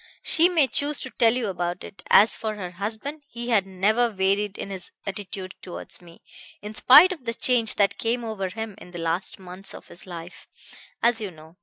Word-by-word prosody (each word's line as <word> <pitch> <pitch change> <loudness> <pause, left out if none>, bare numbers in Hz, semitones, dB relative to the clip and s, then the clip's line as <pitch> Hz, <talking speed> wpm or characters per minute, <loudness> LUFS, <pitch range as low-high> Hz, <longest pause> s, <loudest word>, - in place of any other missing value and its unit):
"She 335 +2 +4
may 320 -6 +3
choose 290 +3 0
to 260 - -5
tell 230 -1 +3
you 245 -3 -1
about 175 -2 -3
it. 195 - -11
As 210 +3 +7
for 220 -1 -3
her 185 -4 -6
husband, 220 - -5
he 240 +1 -6
had 205 -5 +3
never 215 +6 +2
varied 200 0 0
in 195 - -6
his 190 -1 -5 0.2
attitude 195 -1 -6
towards 180 - -7
me, 170 -1 -17 0.4
in 210 +1 -8
spite 300 - +8
of 315 -9 -7
the 230 0 -2
change 240 -3 +2
that 200 -1 +2
came 235 +1 0
over 200 -4 -3
him 220 +2 -6
in - - -12
the 175 - -9
last 165 +3 -2
months 185 +1 -5
of - - -13
his 175 - -8
life, 170 0 -9 0.6
as 235 -1 +3
you 205 - -3
know. 160 0 -16
205 Hz, 205 wpm, -25 LUFS, 185-235 Hz, 0.6 s, spite